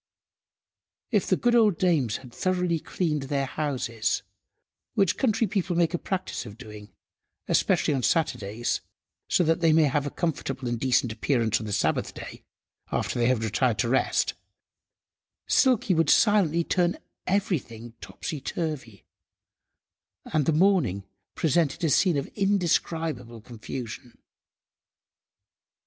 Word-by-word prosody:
If -, -, +1 dB
the -, -, +3 dB
good 240 Hz, -1 st, +2 dB
old 215 Hz, -7 st, +4 dB
dames 150 Hz, -, +1 dB
had 125 Hz, -3 st, -14 dB
thoroughly 180 Hz, -1 st, 0 dB
cleaned 150 Hz, -5 st, -2 dB
their 140 Hz, -1 st, 0 dB
houses, 130 Hz, -6 st, -2 dB, 0.7 s
which 190 Hz, -2 st, +3 dB
country 230 Hz, -3 st, +1 dB
people 190 Hz, -3 st, -1 dB
make 170 Hz, 0 st, +2 dB
a 175 Hz, -, -1 dB
practice 190 Hz, -1 st, -3 dB
of 105 Hz, +1 st, -11 dB
doing, 105 Hz, -4 st, -11 dB, 0.6 s
especially -, -, +2 dB
on 135 Hz, -, 0 dB
Saturdays, 120 Hz, -, 0 dB, 0.5 s
so -, -, +3 dB
that 165 Hz, +1 st, +2 dB
they 165 Hz, -1 st, +4 dB
may 160 Hz, 0 st, +5 dB
have 145 Hz, 0 st, +1 dB
a -, -, -1 dB
comfortable 135 Hz, -5 st, -3 dB
and 120 Hz, -1 st, -2 dB
decent 125 Hz, -2 st, +2 dB
appearance 115 Hz, -1 st, +1 dB
on 110 Hz, -, -6 dB
the -, -, -4 dB
Sabbath–day, -, -, -2 dB, 0.5 s
after -, -, -1 dB
they 120 Hz, -, +3 dB
had 125 Hz, -3 st, +1 dB
retired 115 Hz, +1 st, +1 dB
to 115 Hz, +3 st, 0 dB
rest, 130 Hz, -, +1 dB, 1.1 s
Silky 245 Hz, -6 st, +3 dB
would 165 Hz, -3 st, +2 dB
silently 185 Hz, -6 st, +4 dB
turn 175 Hz, 0 st, +1 dB, 0.3 s
everything 140 Hz, -, -2 dB
topsy–turvy, 145 Hz, -, -5 dB, 1.3 s
and 155 Hz, -3 st, +1 dB
the -, -, +4 dB
morning 155 Hz, -, +2 dB, 0.3 s
presented 160 Hz, 0 st, +1 dB
a 160 Hz, -, +2 dB
scene 175 Hz, +1 st, +3 dB
of 140 Hz, -, -1 dB
indescribable 165 Hz, -, 0 dB
confusion. 120 Hz, +2 st, -8 dB
150 Hz, 130 wpm, -26 LUFS, 120-175 Hz, 1.3 s, may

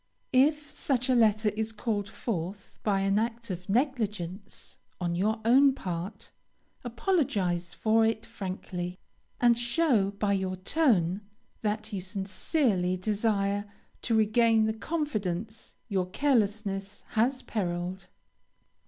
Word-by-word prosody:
If 295 Hz, +3 st, +3 dB
such 255 Hz, -2 st, -1 dB
a -, -, +5 dB
letter 220 Hz, -2 st, +4 dB
is 220 Hz, +2 st, -3 dB
called 210 Hz, -2 st, -2 dB
forth 195 Hz, -3 st, -5 dB
by 200 Hz, -2 st, +1 dB
an 195 Hz, +1 st, +2 dB
act 230 Hz, -1 st, -3 dB
of 180 Hz, +1 st, -6 dB
negligence 210 Hz, -, -2 dB, 0.2 s
on 175 Hz, -2 st, -1 dB
your 210 Hz, +6 st, +1 dB
own 265 Hz, +3 st, +6 dB
part, 180 Hz, -1 st, -5 dB, 0.5 s
apologize 225 Hz, -, 0 dB
for 225 Hz, 0 st, +3 dB
it 220 Hz, 0 st, 0 dB
frankly, 185 Hz, -2 st, -5 dB, 0.4 s
and 240 Hz, -1 st, +5 dB
show 240 Hz, -3 st, +2 dB
by 200 Hz, 0 st, 0 dB
your 190 Hz, -1 st, -1 dB
tone 190 Hz, -, +2 dB, 0.4 s
that 215 Hz, 0 st, -2 dB
you 195 Hz, -, -2 dB
sincerely 190 Hz, -, 0 dB
desire 205 Hz, 0 st, 0 dB, 0.4 s
to 230 Hz, -, 0 dB
regain 220 Hz, +1 st, +4 dB
the 220 Hz, -, 0 dB
confidence 220 Hz, -, -3 dB
your 190 Hz, -5 st, 0 dB
carelessness 205 Hz, -5 st, 0 dB
has 255 Hz, +4 st, +1 dB
periled. 180 Hz, -2 st, -3 dB
210 Hz, 120 wpm, -29 LUFS, 190-235 Hz, 0.5 s, own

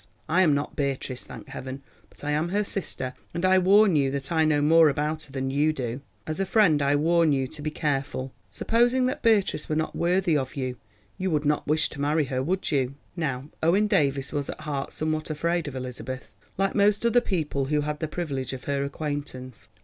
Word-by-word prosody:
I 180 Hz, +4 st, +3 dB
am 155 Hz, -6 st, +4 dB
not 145 Hz, +1 st, -3 dB
Beatrice, 135 Hz, -2 st, -2 dB
thank -, -, -10 dB
Heaven, 130 Hz, +1 st, -7 dB, 0.3 s
but -, -, -15 dB
I 145 Hz, -, -1 dB
am 155 Hz, +3 st, 0 dB
her 205 Hz, +3 st, +1 dB
sister, 135 Hz, -10 st, -2 dB, 0.2 s
and 170 Hz, +2 st, 0 dB
I 185 Hz, 0 st, +5 dB
warn 195 Hz, 0 st, +5 dB
you 140 Hz, -2 st, +3 dB
that 140 Hz, +1 st, -3 dB
I 160 Hz, -1 st, +3 dB
know 150 Hz, -1 st, +3 dB
more 160 Hz, +2 st, +6 dB
about 150 Hz, +2 st, -1 dB
her 140 Hz, -, -16 dB
than 135 Hz, 0 st, -2 dB
you 150 Hz, +3 st, +2 dB
do. 125 Hz, -3 st, -4 dB, 0.2 s
As 155 Hz, +3 st, -3 dB
a 195 Hz, -, +1 dB
friend 180 Hz, -10 st, +4 dB
I 140 Hz, +1 st, +3 dB
warn 165 Hz, +1 st, +3 dB
you 135 Hz, -1 st, +1 dB
to 155 Hz, -, -8 dB
be 155 Hz, -, -2 dB
careful. 135 Hz, -3 st, -2 dB, 0.2 s
Supposing 240 Hz, +3 st, +2 dB
that 255 Hz, -, -2 dB
Beatrice 210 Hz, -8 st, +2 dB
were 155 Hz, -, 0 dB
not 160 Hz, 0 st, -1 dB
worthy 175 Hz, -1 st, +2 dB
of 135 Hz, -2 st, -2 dB
you, 130 Hz, -2 st, -3 dB, 0.4 s
you 190 Hz, 0 st, 0 dB
would 150 Hz, -3 st, 0 dB
not 150 Hz, +1 st, +1 dB
wish 155 Hz, +1 st, +2 dB
to 145 Hz, -, -7 dB
marry 150 Hz, +1 st, +2 dB
her, 130 Hz, -1 st, -2 dB
would 180 Hz, +8 st, -1 dB
you?" 135 Hz, -2 st, 0 dB, 0.2 s
Now 140 Hz, -5 st, -3 dB
Owen 185 Hz, +6 st, +3 dB
Davies 140 Hz, -8 st, +1 dB
was 145 Hz, -2 st, -2 dB
at -, -, -6 dB
heart 145 Hz, -3 st, -3 dB
somewhat 155 Hz, 0 st, -2 dB
afraid 170 Hz, +1 st, -1 dB
of 140 Hz, -, -6 dB
Elizabeth, 130 Hz, 0 st, -6 dB, 0.3 s
like 195 Hz, 0 st, +1 dB
most 205 Hz, +2 st, +3 dB
other 240 Hz, +1 st, +4 dB
people 155 Hz, -, -1 dB
who 150 Hz, +2 st, +1 dB
had 150 Hz, 0 st, -3 dB
the 155 Hz, -, -2 dB
privilege 140 Hz, -6 st, -3 dB
of 130 Hz, -, -7 dB
her 140 Hz, -1 st, -1 dB
acquaintance. 140 Hz, -4 st, -5 dB
150 Hz, 215 wpm, -26 LUFS, 140-170 Hz, 0.4 s, more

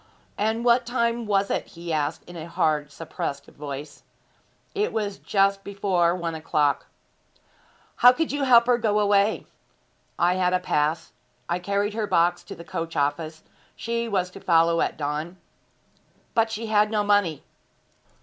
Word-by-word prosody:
'And 220 Hz, +3 st, -1 dB
what 240 Hz, +1 st, +4 dB
time 235 Hz, -1 st, -1 dB
was 200 Hz, -1 st, +1 dB
it?' -, -, -2 dB
he 170 Hz, -1 st, -6 dB
asked 150 Hz, +1 st, -1 dB
in 175 Hz, -, -12 dB
a 165 Hz, -1 st, -7 dB
hard, 150 Hz, -3 st, 0 dB
suppressed 145 Hz, -1 st, -5 dB
voice. 145 Hz, 0 st, -8 dB, 0.7 s
'It 420 Hz, +1 st, 0 dB
was 205 Hz, -3 st, -3 dB
just 195 Hz, 0 st, +1 dB
before 190 Hz, -4 st, +1 dB
one 170 Hz, -2 st, -3 dB
o'clock.' 150 Hz, -2 st, 0 dB, 1.1 s
'How 245 Hz, -, +8 dB
could 320 Hz, +5 st, -1 dB
you 285 Hz, 0 st, -1 dB
help 235 Hz, -2 st, +6 dB
her 245 Hz, 0 st, +3 dB
to -, -, -11 dB
go 210 Hz, -1 st, +2 dB
away?' 205 Hz, +1 st, +2 dB, 0.7 s
'I 175 Hz, +1 st, +3 dB
had 180 Hz, -1 st, +1 dB
a 185 Hz, -, +3 dB
pass. 155 Hz, -2 st, -1 dB, 0.4 s
I 175 Hz, +1 st, -1 dB
carried 200 Hz, +3 st, -1 dB
her 215 Hz, -1 st, -2 dB
box 175 Hz, 0 st, +2 dB
to -, -, -8 dB
the 170 Hz, -, -10 dB
coach 165 Hz, 0 st, -5 dB
office. 155 Hz, +2 st, -2 dB, 0.3 s
She 235 Hz, 0 st, -3 dB
was 185 Hz, -3 st, -1 dB
to 195 Hz, -, -11 dB
follow 165 Hz, -2 st, +3 dB
at -, -, -1 dB
dawn.' 150 Hz, +4 st, -3 dB, 1.0 s
'But 225 Hz, -1 st, +2 dB
she 225 Hz, +1 st, -4 dB
had 210 Hz, -1 st, +3 dB
no 210 Hz, -1 st, 0 dB
money.' 205 Hz, -7 st, +1 dB
185 Hz, 160 wpm, -25 LUFS, 165-215 Hz, 1.1 s, How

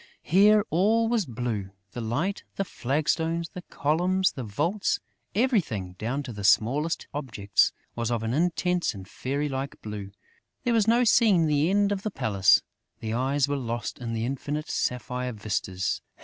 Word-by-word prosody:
Here, 205 Hz, +4 st, +5 dB
all 215 Hz, +7 st, +3 dB
was 225 Hz, -7 st, +1 dB
blue: 115 Hz, -5 st, -3 dB, 0.2 s
the 120 Hz, -, -5 dB
light, 145 Hz, -, -1 dB
the 195 Hz, -, -1 dB
flagstones, 160 Hz, +4 st, -1 dB
the 180 Hz, -, -8 dB
columns, 180 Hz, +5 st, +1 dB
the 130 Hz, -, -6 dB
vaults; 165 Hz, -, 0 dB, 0.4 s
everything, 175 Hz, -, +1 dB
down 125 Hz, +6 st, -2 dB
to 125 Hz, -, -7 dB
the 105 Hz, -1 st, -7 dB
smallest 135 Hz, +11 st, +2 dB
objects, 115 Hz, -9 st, +1 dB, 0.2 s
was 115 Hz, -1 st, -1 dB
of 115 Hz, -2 st, -1 dB
an 115 Hz, +1 st, -1 dB
intense 175 Hz, -, +1 dB
and 95 Hz, -1 st, -9 dB
fairy 140 Hz, +7 st, -2 dB
like 135 Hz, 0 st, -4 dB
blue. 105 Hz, -2 st, -6 dB, 0.5 s
There 245 Hz, -2 st, +1 dB
was 225 Hz, -2 st, +3 dB
no 235 Hz, +2 st, +5 dB
seeing 210 Hz, -7 st, +5 dB
the 150 Hz, +1 st, +2 dB
end 200 Hz, +1 st, +3 dB
of 200 Hz, -1 st, -1 dB
the 215 Hz, -, -2 dB
palace; 100 Hz, -, +3 dB, 0.4 s
the 110 Hz, -1 st, -3 dB
eyes 135 Hz, +3 st, +1 dB
were 145 Hz, 0 st, -1 dB
lost 120 Hz, -2 st, -4 dB
in 115 Hz, -2 st, -4 dB
the 115 Hz, 0 st, -1 dB
infinite 145 Hz, +4 st, -3 dB
sapphire 125 Hz, +1 st, -2 dB
vistas. 100 Hz, -3 st, -2 dB
145 Hz, 165 wpm, -27 LUFS, 115-180 Hz, 0.5 s, Here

